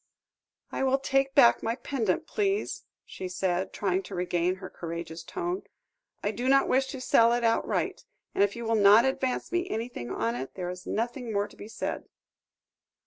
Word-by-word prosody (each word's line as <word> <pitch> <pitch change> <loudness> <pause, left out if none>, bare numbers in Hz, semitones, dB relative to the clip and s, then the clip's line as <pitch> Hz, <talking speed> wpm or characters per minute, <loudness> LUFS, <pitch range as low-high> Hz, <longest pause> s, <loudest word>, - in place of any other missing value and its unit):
"I - - -3
will 265 0 +3
take 270 0 +1
back 120 0 +7
my 225 +1 -1
pendant, 255 - -1
please," 405 +1 -1 0.2
she 185 - -6
said, 185 0 -1
trying 190 -2 0
to - - -6
regain 180 0 0
her 185 0 -8
courageous 170 -1 -6
tone. 360 - -3 0.6
"I 205 - +1
do 245 +4 -2
not 275 0 +5
wish 265 +1 +2
to 265 - -6
sell 235 -2 +4
it 240 0 0
outright, 230 0 0 0.3
and - - +3
if 200 0 +1
you 235 0 -5
will 225 - +1
not 210 +2 +7
advance 265 -1 -1
me 355 +1 0
anything 225 - -4
on 115 -2 -1
it, 130 +2 -6
there 180 -1 -3
is 180 0 -9
nothing 240 +1 -2
more 205 0 0
to - - -17
be - - -10
said." 225 - -4
225 Hz, 185 wpm, -28 LUFS, 180-265 Hz, 0.6 s, back